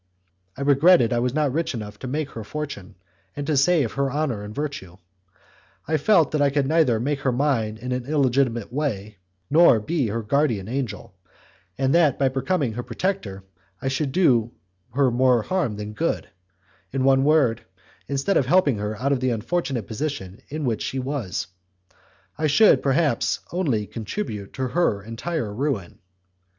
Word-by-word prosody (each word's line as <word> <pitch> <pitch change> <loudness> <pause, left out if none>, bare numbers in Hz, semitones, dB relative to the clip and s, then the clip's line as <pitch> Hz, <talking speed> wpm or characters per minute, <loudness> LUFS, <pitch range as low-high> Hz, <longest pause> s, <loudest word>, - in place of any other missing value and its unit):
I - - -6
regretted 140 -2 +5
I 120 - +1
was 125 +2 -1
not 150 -3 +1
rich 165 -1 -1
enough 105 -2 -7
to 130 - -6
make 145 +2 -3
her 115 - -7
fortune, 110 -5 -6 0.4
and 145 - -4
to 150 - 0
save 140 -3 +3
her 140 -1 -1
honour 140 -7 -1
and 105 +4 -9
her 145 - 0
virtue. 95 - -7 0.9
I 155 +1 +2
felt 165 -2 +3
that 150 - 0
I 145 - +4
could 140 0 0
neither 155 -7 +3
make 140 +4 -1
her 135 -2 0
mine 120 -5 0
in 125 +3 -6
an 125 0 -3
illegitimate 130 -6 +1
way 105 -8 -3 0.3
nor 155 -7 +6
be 140 +3 -1
her 115 +2 -3
guardian 115 -5 0
angel, 125 -1 -4 0.6
and 135 0 +1
that 160 -6 +4
by 135 -1 +2
becoming 135 -1 -1
her 120 - -4
protector 125 - -3 0.4
I 135 - -2
should 135 +1 -1
do 125 -9 +3 0.4
her 135 -2 +3
more 125 -1 +3
harm 175 - -1
than 105 +1 -6
good; - - -1 0.6
in 135 -1 -1
one 135 0 +4
word, 140 -6 +3 0.4
instead 140 +8 0
of 130 - +1
helping 145 - +3
her 105 +1 -3
out 140 +3 0
of 140 - +2
the 130 0 0
unfortunate 125 - -2
position 110 -6 -5
in 150 0 -4
which 115 -4 -1
she 135 - -3
was, 130 -7 -3 0.9
I 155 - +2
should, 210 +9 +5
perhaps, 140 -2 +1
only 140 - 0
contribute 110 - -5
to 130 -1 -2
her 120 - +1
entire 115 +1 -4
ruin. 115 - -3
135 Hz, 170 wpm, -23 LUFS, 115-150 Hz, 0.9 s, nor